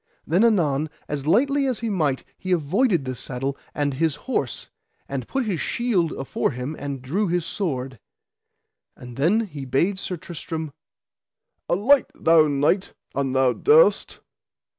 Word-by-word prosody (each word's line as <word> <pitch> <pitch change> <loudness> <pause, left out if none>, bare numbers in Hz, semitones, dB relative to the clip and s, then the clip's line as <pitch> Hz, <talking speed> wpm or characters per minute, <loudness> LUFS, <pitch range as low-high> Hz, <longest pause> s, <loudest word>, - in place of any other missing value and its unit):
Then 180 +7 +3
anon 160 -10 +2 0.2
as 145 -1 -4
lightly 275 - +3
as 255 -3 -2
he 230 - -1
might 150 -8 0
he 185 - -6
avoided 175 - +1
the 130 - -3
saddle 135 +2 -4 0.2
and 145 -1 0
his 155 +2 0
horse, 150 - -3 0.4
and 135 -3 -4
put 270 -2 -1
his 185 -8 -2
shield 205 -9 0
afore 135 - -1
him 125 +5 -5
and 140 -2 -5
drew 190 +11 0
his 175 -1 0
sword. 130 - -3 1.0
And 125 -1 -11
then 170 - +3
he 160 -11 -6
bade 170 +10 0
Sir 180 -2 -4
Tristram: 160 -2 -6 1.0
Alight, 245 +10 +4
thou 160 -1 +5
knight, 145 +7 +1 0.2
an 135 -2 -1
thou 130 -1 +3
durst. 470 +3 +4
160 Hz, 145 wpm, -23 LUFS, 135-200 Hz, 1.0 s, thou